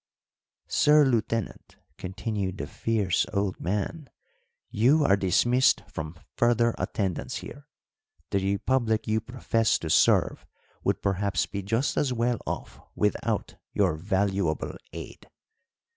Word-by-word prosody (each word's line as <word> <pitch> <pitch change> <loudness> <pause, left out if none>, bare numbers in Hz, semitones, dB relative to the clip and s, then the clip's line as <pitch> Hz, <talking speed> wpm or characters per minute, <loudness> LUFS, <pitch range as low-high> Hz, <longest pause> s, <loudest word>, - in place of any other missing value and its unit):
"Sir 150 0 +5
Lieutenant," 115 -4 -1 0.2
continued 95 0 -3
the - - -4
fierce 105 -6 0
old 100 -1 -1
man, 105 - -3 0.6
"you 135 +8 +4
are 100 - +5
dismissed 100 +5 +3
from 80 -4 -6 0.2
further 120 0 +3
attendance 95 -5 -2
here. 145 0 -11 0.6
The 100 - +2
republic 110 +3 0
you 110 0 +1
profess 115 -2 0
to 80 - -4
serve - - +3 0.4
would - - 0
perhaps 100 -2 0
be 100 - -5
just 115 +8 -1
as 140 - +1
well 120 -1 0
off - - -5 0.2
without 105 -1 -1 0.2
your - - +3
valuable 95 -1 -1 0.2
aid. - - -9
105 Hz, 115 wpm, -27 LUFS, 95-120 Hz, 0.6 s, Sir